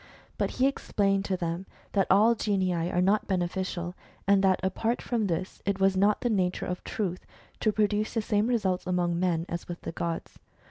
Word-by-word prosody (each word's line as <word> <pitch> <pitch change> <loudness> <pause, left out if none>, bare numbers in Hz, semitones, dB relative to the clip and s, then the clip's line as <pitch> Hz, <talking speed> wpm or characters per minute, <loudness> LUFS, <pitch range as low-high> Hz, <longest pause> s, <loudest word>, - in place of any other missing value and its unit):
But - - +1
he 255 - +4
explained 200 -7 +1
to 190 -2 -1
them 170 +2 -3 0.2
that 195 -2 +2
all 215 +5 +6
genii 195 -5 0
are 175 +1 0
not 210 +3 +2
beneficial, 180 -1 -2 0.3
and 200 -1 +5
that 190 -1 +4
apart 220 +5 0
from 230 -4 -1
this, 180 +1 -3
it 200 -1 -1
was 195 0 +3
not 200 +2 +4
of - - -36
the 245 - +1
nature 185 -4 0
of 180 0 -4
Truth 185 -4 -3 0.4
to 215 - +2
produce 210 +1 0
the 225 - +2
same 210 +1 +1
results 190 -7 0
among 175 -1 +1
men 170 -2 +1
as 170 0 -5
with 175 0 -6
the - - -5
gods. 165 0 -4
190 Hz, 195 wpm, -28 LUFS, 180-210 Hz, 0.4 s, all